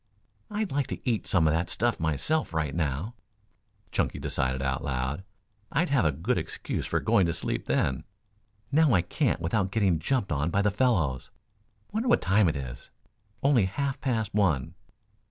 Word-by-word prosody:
"I'd 210 Hz, -1 st, -2 dB
like 140 Hz, -1 st, 0 dB
to -, -, -7 dB
eat 115 Hz, -4 st, 0 dB
some 85 Hz, -4 st, +3 dB
of 75 Hz, -, +3 dB
that 85 Hz, +1 st, 0 dB
stuff 120 Hz, 0 st, +1 dB
myself, 80 Hz, -, 0 dB
right 80 Hz, -3 st, 0 dB
now," 80 Hz, -, -2 dB, 0.8 s
Chunky -, -, 0 dB
decided 65 Hz, 0 st, -1 dB
out 65 Hz, -1 st, -1 dB
loud. 65 Hz, +5 st, -2 dB, 0.5 s
"I'd 170 Hz, +4 st, +1 dB
have 140 Hz, -, +3 dB
a 80 Hz, -, +4 dB
good 90 Hz, -, -1 dB
excuse 80 Hz, -, -4 dB
for -, -, +1 dB
going 95 Hz, -4 st, +3 dB
to 85 Hz, -, -1 dB
sleep -, -, -3 dB
then. 65 Hz, -, 0 dB, 0.7 s
Now 150 Hz, -5 st, +4 dB
I 90 Hz, -, +3 dB
can't -, -, 0 dB
without 95 Hz, +4 st, 0 dB
getting 95 Hz, -5 st, +2 dB
jumped 100 Hz, -, 0 dB
on 75 Hz, +2 st, 0 dB
by 100 Hz, +3 st, +1 dB
the 105 Hz, -, +3 dB
fellows. 95 Hz, -, +1 dB, 0.6 s
Wonder 225 Hz, +4 st, -1 dB
what -, -, +5 dB
time 95 Hz, 0 st, +3 dB
it 80 Hz, -, -2 dB
is 60 Hz, -3 st, -7 dB, 0.5 s
only 135 Hz, -7 st, +4 dB
half 140 Hz, +8 st, -2 dB
past 115 Hz, -6 st, -1 dB
one. 90 Hz, -11 st, +1 dB
95 Hz, 175 wpm, -28 LUFS, 75-125 Hz, 0.8 s, what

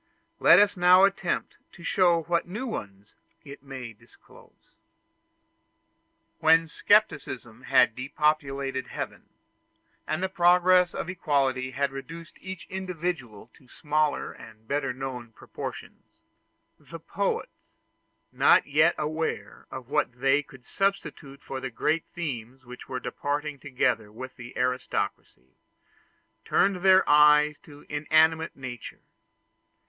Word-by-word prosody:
Let -, -, +7 dB
us 205 Hz, +1 st, +4 dB
now 180 Hz, +1 st, +6 dB
attempt 195 Hz, -2 st, 0 dB, 0.2 s
to 170 Hz, -, -14 dB
show 175 Hz, -2 st, +2 dB
what 170 Hz, +1 st, -1 dB
new 210 Hz, +9 st, -5 dB
ones 100 Hz, -, -7 dB, 0.3 s
it 140 Hz, -1 st, -11 dB
may 130 Hz, -4 st, -8 dB
disclose. 105 Hz, -, -22 dB, 1.7 s
When 165 Hz, +1 st, +4 dB
scepticism 135 Hz, -, 0 dB
had 125 Hz, -4 st, +4 dB
depopulated 135 Hz, -1 st, -1 dB
heaven, -, -, -7 dB, 0.8 s
and 155 Hz, +4 st, -2 dB
the -, -, +1 dB
progress 180 Hz, -1 st, +4 dB
of -, -, -4 dB
equality 140 Hz, -7 st, 0 dB
had 140 Hz, +1 st, -1 dB
reduced 165 Hz, +5 st, -10 dB
each 190 Hz, -2 st, -8 dB
individual 175 Hz, -, -5 dB
to 130 Hz, -, -22 dB
smaller 150 Hz, +2 st, -1 dB
and 110 Hz, 0 st, -15 dB
better 140 Hz, -1 st, -1 dB
known 125 Hz, -3 st, -7 dB
proportions, -, -, -9 dB, 0.8 s
the -, -, -10 dB
poets, -, -, -4 dB, 0.5 s
not -, -, +4 dB
yet 155 Hz, +4 st, +3 dB
aware 155 Hz, +1 st, -4 dB
of 130 Hz, -2 st, -8 dB
what 150 Hz, -4 st, 0 dB
they 135 Hz, +2 st, +3 dB
could 135 Hz, -3 st, -17 dB
substitute 185 Hz, -8 st, -3 dB
for 135 Hz, -, -6 dB
the 130 Hz, 0 st, -5 dB
great 150 Hz, +8 st, -1 dB
themes 130 Hz, -6 st, -6 dB
which 125 Hz, 0 st, -11 dB
were 130 Hz, -, -3 dB
departing 145 Hz, +2 st, -4 dB
together 120 Hz, -6 st, -1 dB
with 130 Hz, +4 st, -9 dB
the 120 Hz, +1 st, -11 dB
aristocracy, 125 Hz, -, -3 dB, 0.9 s
turned 195 Hz, -1 st, +2 dB
their 190 Hz, +1 st, +5 dB
eyes 150 Hz, 0 st, +5 dB
to 145 Hz, -1 st, -16 dB
inanimate 155 Hz, +2 st, +2 dB
nature. 125 Hz, -3 st, -8 dB
145 Hz, 120 wpm, -26 LUFS, 130-170 Hz, 1.7 s, Let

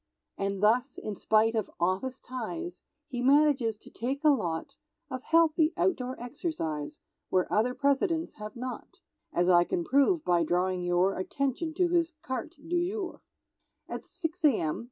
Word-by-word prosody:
And 195 Hz, 0 st, -2 dB
thus, 235 Hz, +4 st, +3 dB
in 210 Hz, -, -5 dB
spite 220 Hz, +3 st, +3 dB
of 220 Hz, -2 st, -1 dB
office 190 Hz, +10 st, 0 dB
ties, 295 Hz, +8 st, -6 dB, 0.3 s
He 245 Hz, -1 st, -4 dB
manages 270 Hz, -4 st, +4 dB
to -, -, -16 dB
take 270 Hz, +5 st, -3 dB
a 305 Hz, -, +6 dB
lot 170 Hz, -, -2 dB, 0.4 s
Of 255 Hz, -1 st, -4 dB
healthy 325 Hz, +1 st, +3 dB
outdoor 260 Hz, -9 st, 0 dB
exercise, 235 Hz, -, -4 dB, 0.3 s
Where 185 Hz, -1 st, +2 dB
other 240 Hz, +4 st, +2 dB
Presidents 295 Hz, +5 st, +1 dB
have 210 Hz, 0 st, -7 dB
not; 250 Hz, +1 st, -6 dB, 0.3 s
As 175 Hz, +1 st, +1 dB
I 175 Hz, -1 st, +6 dB
can 175 Hz, 0 st, -2 dB
prove 280 Hz, -, +3 dB
by 175 Hz, -1 st, +3 dB
drawing 180 Hz, +2 st, 0 dB
your 175 Hz, +2 st, +2 dB
Attention 275 Hz, -, -2 dB
to 355 Hz, 0 st, +2 dB
his 340 Hz, -1 st, +2 dB
carte 260 Hz, +6 st, -4 dB
du 345 Hz, +1 st, +1 dB
jour. 395 Hz, -3 st, -5 dB, 0.7 s
At -, -, -5 dB
6 355 Hz, -1 st, -5 dB
a.m. 215 Hz, -, +2 dB
255 Hz, 155 wpm, -29 LUFS, 195-315 Hz, 0.7 s, a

